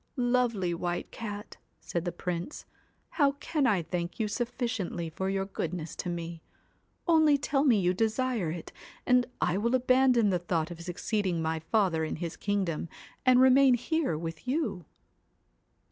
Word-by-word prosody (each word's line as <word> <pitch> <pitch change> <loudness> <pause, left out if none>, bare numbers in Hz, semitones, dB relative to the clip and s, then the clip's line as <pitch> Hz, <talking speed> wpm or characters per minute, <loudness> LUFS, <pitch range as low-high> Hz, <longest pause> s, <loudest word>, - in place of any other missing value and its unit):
'Lovely 245 - +1
White 175 +1 -3
Cat,' 210 -2 -7 0.2
said 170 0 -4
the 175 - -1
Prince, 175 - -5 0.4
'how 285 -3 +2
can 285 0 0
I 195 -7 +2
thank 175 +3 -4
you 220 - +1
sufficiently 225 -8 -3
for 190 +4 -2
your 195 0 -1
goodness 170 -4 -4
to 180 - -3
me? 170 -1 -5 0.7
Only 315 -3 +5
tell 280 0 0
me 245 -8 +4
you 180 -1 +2
desire 225 -1 0
it, 165 +1 -6 0.3
and 250 -1 +4
I 185 - +1
will 235 +4 +2
abandon 255 -3 +4
the 180 - +1
thought 170 -1 -1
of 170 -1 -8
succeeding 180 +1 -1
my 160 0 -1
father 170 -2 +1
in 155 - -2
his 170 0 -5
kingdom 190 -6 -1 0.4
and 255 -1 +7
remain 260 0 +6
here 300 - -1
with 165 +6 -6
you.' 255 - -1
200 Hz, 155 wpm, -29 LUFS, 170-250 Hz, 0.7 s, and